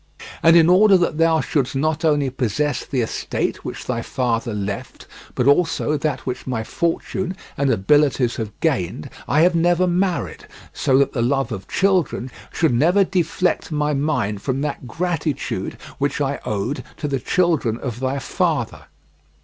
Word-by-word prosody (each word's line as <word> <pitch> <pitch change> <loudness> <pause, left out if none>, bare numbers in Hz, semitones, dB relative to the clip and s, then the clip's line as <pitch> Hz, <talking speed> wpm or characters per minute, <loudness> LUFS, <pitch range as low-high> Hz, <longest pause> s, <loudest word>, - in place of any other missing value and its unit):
And 165 +1 +6
in 165 -1 +6
order 190 +2 +6
that 170 -3 -1
thou 165 -1 +4
shouldst 135 -3 -1
not 155 +4 0
only 145 -4 +2
possess 135 +3 -1
the 130 -3 -1
estate 115 - -2
which - - -6
thy 115 -2 -2
father 120 -1 -1
left, 100 -1 -5 0.3
but 125 - +1
also 155 +1 +2
that 145 -2 -1
which 125 0 -5
my 120 -4 -2
fortune 180 +6 -2 0.2
and 140 0 +1
abilities 130 +2 +2
have 110 -2 -4
gained, 90 - -1 0.2
I 150 - +3
have 175 +2 +5
never 175 +2 +3
married, 180 0 -1 0.3
so 130 - +2
that 140 - +2
the 120 - -1
love 135 +2 0
of 100 -3 -6
children 180 -10 +1 0.2
should 160 -7 +1
never 170 +11 +4
deflect 180 -2 0
my 150 0 0
mind 130 -9 -1
from 135 0 -2
that 145 -3 -4
gratitude 165 -2 -2 0.2
which - - -1
I - - -1
owed 110 +8 -2
to 150 - -3
the 135 -2 -1
children 155 -8 +1
of 120 -2 -5
thy 130 +1 -1
father. 135 - -1
145 Hz, 160 wpm, -21 LUFS, 125-165 Hz, 0.3 s, And